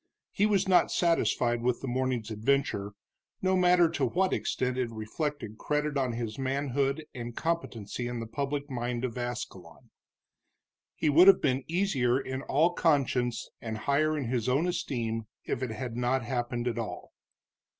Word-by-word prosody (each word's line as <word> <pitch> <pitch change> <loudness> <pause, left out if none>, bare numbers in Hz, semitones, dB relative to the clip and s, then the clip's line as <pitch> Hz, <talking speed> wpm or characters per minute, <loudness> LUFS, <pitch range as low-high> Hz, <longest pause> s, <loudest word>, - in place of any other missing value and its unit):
He 205 - +2
was 200 -2 +2
not 185 -2 +5
satisfied 120 -8 +2
with 125 0 0
the 135 - -4
morning's 125 -3 -1
adventure, 110 -3 0 0.5
no 190 0 +2
matter 180 -1 +5
to - - 0
what 190 +1 +1
extent 125 0 -1
it 125 -2 -1
reflected 110 +1 -4
credit 150 0 -1
on 130 -3 0
his 115 0 -4
manhood 140 +2 -1
and 120 -1 -6
competency 125 -8 -2
in 120 -1 -4
the 115 - -4
public 140 +4 -3
mind 120 -2 -2
of 120 - -4
Ascalon. 120 -9 -6 1.0
He 155 - +1
would 170 +6 +7
have 195 -1 +9
been 135 -2 +1
easier 140 -9 +1
in 130 0 -4
all 160 +6 +2
conscience 130 -8 +1
and 110 -1 -4
higher 155 +6 +1
in 140 - -2
his 120 0 -1
own 140 +7 +2
esteem 115 -11 -2 0.2
if - - -2
it 130 - -2
had 115 +1 -5
not 125 +1 +1
happened 120 0 -2
at 120 -1 -1
all. 115 - -6
130 Hz, 160 wpm, -29 LUFS, 120-150 Hz, 1.0 s, have